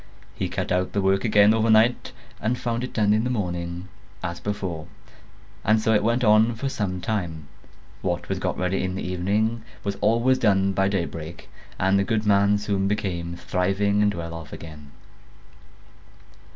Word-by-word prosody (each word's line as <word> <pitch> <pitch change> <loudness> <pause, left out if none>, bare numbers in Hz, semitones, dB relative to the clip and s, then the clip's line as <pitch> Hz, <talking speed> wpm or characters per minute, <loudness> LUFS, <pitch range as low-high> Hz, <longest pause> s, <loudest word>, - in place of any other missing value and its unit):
He - - -3
cut - - -3
out 90 0 0
the 100 - +1
work 95 0 +2
again 105 -2 +5
overnight 110 +2 +3 0.3
and 120 +3 -1
found 120 0 -2
it 125 - -4
done 105 -2 +3
in 110 +1 +2
the 125 - -1
morning, 90 -5 -3 0.4
as 85 0 -4
before; 95 -6 -4 0.8
and 110 +1 +3
so 110 +1 +2
it 105 - +4
went 115 +3 +1
on 110 +1 +4
for 135 +5 -3
some 95 -7 -3
time: 85 -8 -3 0.5
what - - -2
was - - -2
got - - -2
ready 90 +1 0
in 95 0 -2
the 95 - -4
evening 105 +6 0 0.2
was 100 -1 -3
always 115 +5 +3
done 95 -3 +3
by 95 +1 +2
daybreak, 85 -4 -4 0.3
and 95 +1 +2
the - - +2
good 110 +1 -1
man 100 0 +4
soon 100 -1 -1
became 85 -4 -2
thriving 95 +4 0
and 105 -1 +2
well 85 -1 -5
off 80 -2 -8
again. 75 -3 -10
100 Hz, 170 wpm, -24 LUFS, 90-110 Hz, 0.8 s, again